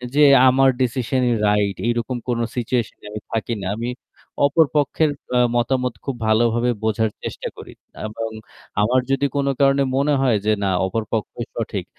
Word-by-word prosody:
যে 150 - +6 0.3
আমার 135 +1 +4
decision-ই 125 0 0 0.2
right 105 -2 +1
এরকম 120 +1 -1
কোন 120 -1 0 0.2
situation 120 -2 -1
এ - - -12
আমি 105 -1 -6
থাকি 115 +1 -1
না। - - -3
আমি 120 +1 -3 0.6
অপর 155 +3 +4
পক্ষের 150 +2 +2 0.3
অ - - +4 0.2
মতামত 125 0 0
খুব 135 -3 -2
ভালো 110 +2 +4
ভাবে 120 +1 +1
বোঝার 110 0 +1
চেষ্টা - - -5
করি। - - -11 0.3
এবং 115 +1 -5 0.5
আমার 125 +4 +3
যদি 140 +1 +2
কোন 140 -1 0
কারণে 140 0 +4
মনে 145 +1 +2
হয় 125 -5 +3
যে 110 - +3
না 95 - +1 0.2
অপর 110 +4 -2
পক্ষই 110 -3 -3
সঠিক - - -3
120 Hz, 170 wpm, -21 LUFS, 110-135 Hz, 0.6 s, যে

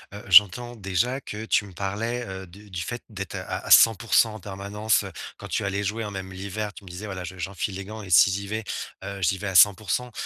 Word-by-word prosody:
heu, 105 - -9
j'entends 105 +6 +6
déjà 110 +6 -1
que 110 -2 -7
tu 110 - +2
me 100 - -13
parlais, 110 +6 -3
heu, 95 0 -7
de 100 +5 -15
du 90 -2 -4
fait 120 +8 -5
d'être 100 -4 -6
à - - -4
à - - -9
100% 115 0 +6
en - - -8
permanence, 100 +2 -1
heu, - - -7 0.3
quand - - -9
tu - - -2
allais 100 +1 -2
jouer 110 +3 -2
hein, 105 - -4
même 95 -1 -7
l'hiver. 100 +2 -5
Tu - - -13
me - - -11
disais, 90 +5 -7
voilà 95 -3 -6
je 90 +1 -8
j'enfile 95 +2 -4
les 95 0 -6
gants 110 +2 -8
et 100 - -10
si 95 +3 +6
j'y 100 +1 -3
vais, 110 +2 -3 0.4
heu, 100 0 -6
j'y 95 +1 +1
vais 105 - -7
à 95 - -3
100% 105 +6 +4
100 Hz, 245 wpm, -25 LUFS, 95-110 Hz, 0.4 s, j'entends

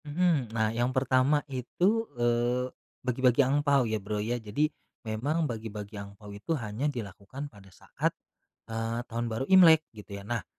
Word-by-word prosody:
Mhm. 150 -5 +1
Nah 110 -1 0
yang 120 +2 +1
pertama 130 +2 +2
itu, 180 - 0
eee, 120 +1 +2 0.4
bagi-bagi 125 +1 +3
angpao 140 -1 +3
ya, 110 -2 -1
Bro, 105 +2 -3
ya. 120 +3 -1
Jadi 110 +8 +1 0.4
memang 140 +10 0
bagi-bagi 110 -2 -6
angpao 100 +1 -11
itu 100 +11 -3
hanya 115 +4 -2
dilakukan 120 +3 -6
pada 100 -5 -16
saat, - - -3 0.6
eee, 115 +1 -2
Tahun 120 +1 -2
Baru 115 +3 -2
Imlek 170 -4 +8 0.2
gitu 100 -1 -8
ya. - - -12
Nah 115 +2 -2
120 Hz, 155 wpm, -29 LUFS, 110-140 Hz, 0.6 s, Imlek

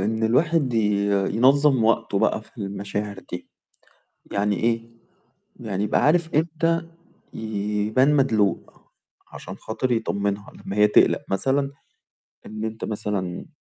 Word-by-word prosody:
إن 110 +3 0
الواحد 140 +1 +2
ي 105 -2 +1 0.3
ينظم 135 0 +4
وقته 115 -3 +1
بقى 110 - +1
في 115 - -21
المشاعر 100 0 -4
دي، 90 - -6 0.8
يعني 100 0 +1
إيه، 115 0 -1 0.7
يعني 105 -3 -2
يبقى 105 - +1
عارف 165 +1 +2
إمتى 165 +1 +1 0.5
يبان 110 +5 0
مدلوق 110 -8 0 0.4
عشان - - -8
خاطر 125 +3 -3
يطمنها 100 -3 -2
لمّا 100 - -8
هي 105 - +6
تقلق 105 - +4
مثلًا، 135 +8 +1 0.8
إن 110 +1 -6
أنت 110 0 -5
مثلًا 100 -4 -3
110 Hz, 120 wpm, -23 LUFS, 100-135 Hz, 0.8 s, هي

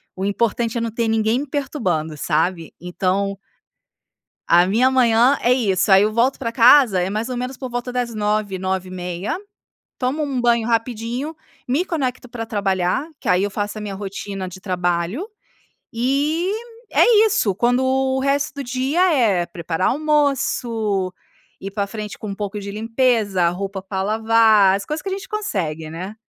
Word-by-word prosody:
O 190 - -5
importante 230 +3 0
é - - -1
não 230 - -2
ter 230 +1 -1
ninguém 220 +2 +1
me 290 - -4
perturbando, 205 - -2
sabe? 165 +3 -1
Então 190 +3 -1 1.1
A 175 +1 +5
minha 235 +7 +3
manhã 250 +1 +4
é 245 +1 +4
isso. 205 -6 +1
Aí 195 +1 +7
eu 215 - +1
volto 240 +4 +2
pra 230 -3 -3
casa, 235 -4 +6
e 180 - -1
mais 215 +4 -3
ou 250 - -3
menos 250 +1 -4
por 260 - -6
volta 245 +1 -4
das 245 -2 -2
9h, 210 -2 -1
9:30 185 - -3 0.6
tomo 265 +5 0
um 275 -4 -2
banho 235 -1 +2
rapidinho, 235 +5 -2 0.3
me 280 +8 +1
conecto 260 -7 -3
pra 230 -1 -6
trabalhar, 195 - 0
que - - -5
aí 180 +1 +3
eu 205 - -1
faço 205 +2 -3
a - - -6
minha 200 -2 -5
rotina 195 -1 -5
de 185 +1 -11
trabalho. 180 - -1 0.6
E, 290 - 0 0.4
é 445 -2 +5
isso. 220 - +2
Quando 245 +5 +2
o 265 0 +1
resto 275 +1 0
do 280 - -3
dia 260 +6 -1
é, 200 -9 +2
preparar 170 +1 -2
almoço, 245 -9 0 0.5
ir 195 - -6
pra 200 0 -2
frente 210 0 -7
com 205 -2 -5
pouco 205 0 -4
de 200 0 -6
limpeza, 220 -4 +1
roupa 195 +2 -4
pra 190 0 -4
lavar. 220 -2 +4
As 200 - -5
coisas 305 +1 -3
que 390 - -5
a - - -2
gente 390 0 -5
consegue, 170 - -3
né. 180 +6 -6
220 Hz, 170 wpm, -21 LUFS, 190-255 Hz, 1.1 s, Aí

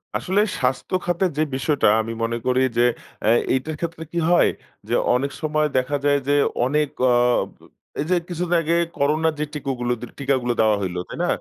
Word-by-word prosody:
আসলে 195 +3 +1 0.2
স্বাস্থ্যখাতের 180 +4 0
যে 155 - +3
বিষয়টা 135 +2 +1
আমি 115 +1 -5
মনে 115 +1 -1
করি 130 0 +2 0.2
যে - - +4 0.4
আ - - +1 0.3
এইটার 130 +4 -2
ক্ষেত্রে 165 -1 -4
কি 170 - -5
হয়, 175 - +5 0.4
যে 115 - -2 0.2
অনেক 140 +3 -1
সময় 155 -1 +1
দেখা 130 +3 0
যায় 145 0 +4
যে 145 - +3 0.3
অনেক 150 +3 +1 0.2
অ - - +4 0.9
এই 145 - 0
যে 185 - +4
কিছুদিন 175 0 -1
আগে 165 +1 0 0.2
করোনার 155 +3 +2
যে - - +1
টিকগুলো 130 -4 -2
দিল 120 - -7
টিকাগুলো 130 -3 0
দেওয়া 110 -1 +4
হইল। 90 -2 -3
তাই - - -8
না? - - +1
145 Hz, 180 wpm, -22 LUFS, 125-160 Hz, 0.9 s, হয়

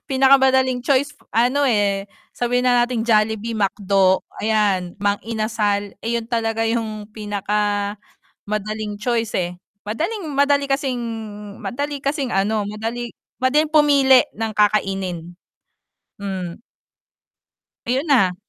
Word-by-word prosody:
pinakamadaling 265 -1 +4
choice 280 +1 +2 0.2
ano, 250 +5 +3
eh, 205 -5 +1 0.3
sabihin 245 +1 0
na 245 -1 +4
nating 240 -2 -2
Jollibee, 220 0 +1
McDo, 195 -2 +2 0.2
ayan 205 -5 +1
Mang 205 0 +2
Inasal, 215 -3 -1
iyon 230 0 -2
talaga 225 -1 0
yung 220 -2 -3
pinaka 210 -1 -3 0.9
madaling 215 0 -3
choice, 230 +1 -1
eh. 175 -1 -1 0.3
Madaling 325 - -3
madali 280 0 +3
kasing, 275 -3 -1 0.6
madali 285 +2 -3
kasing 275 -2 -1
ano, 205 +2 +1
madali 225 +3 -4 0.3
madaling 295 +4 +3
pumili 280 -4 +5
ng 225 0 -2
kakainin. 195 -5 0 0.9
Hmm. 190 -4 -5 1.3
Ayun 260 +6 0
na. 195 -10 +4
225 Hz, 105 wpm, -21 LUFS, 205-260 Hz, 1.3 s, pumili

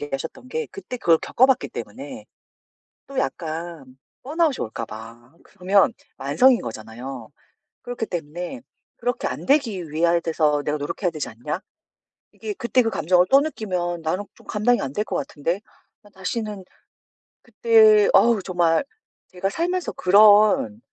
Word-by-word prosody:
얘기하셨던 145 - -6
게 470 -1 -3
그때 370 -11 -8
그걸 165 -8 +3
겪어봤기 260 +1 +2
때문에 - - -8 0.8
또 275 -1 -7
약간 160 - -4 0.2
번아웃이 305 0 +1
올까 115 0 -5
봐. 115 +4 -12
그러면 195 +4 +2 0.3
만성인 230 - +4
거잖아요. 115 +2 -8 0.5
그렇기 245 -2 -4
때문에 175 - -6 0.4
'그렇게 245 0 -2
안 - - -5
되기 225 - +1
위하 170 +2 +2
돼서 155 -3 +1
내가 150 0 -1
노력해야 170 +5 -2
되지 155 -3 -4
않냐? 135 +10 -5 0.7
이게 425 - -6
그때 255 -6 +1
그 225 - 0
감정을 180 +3 +3
또 275 - +8
느끼면 180 - -3
나는 180 +6 -2
좀 - - -20
감당이 225 +4 +1
안 135 0 -4
될 210 - -1
것 - - -4
같은데. 165 +6 -2 0.4
난 205 - -19
다시는' 205 +1 -4 0.8
그때 440 -2 +5
어우 230 -4 +5
정말 170 -3 +1 0.4
제가 190 +1 -3
살면서 355 - -2
그런 210 +5 +5
185 Hz, 300 characters per minute, -23 LUFS, 155-245 Hz, 0.8 s, 또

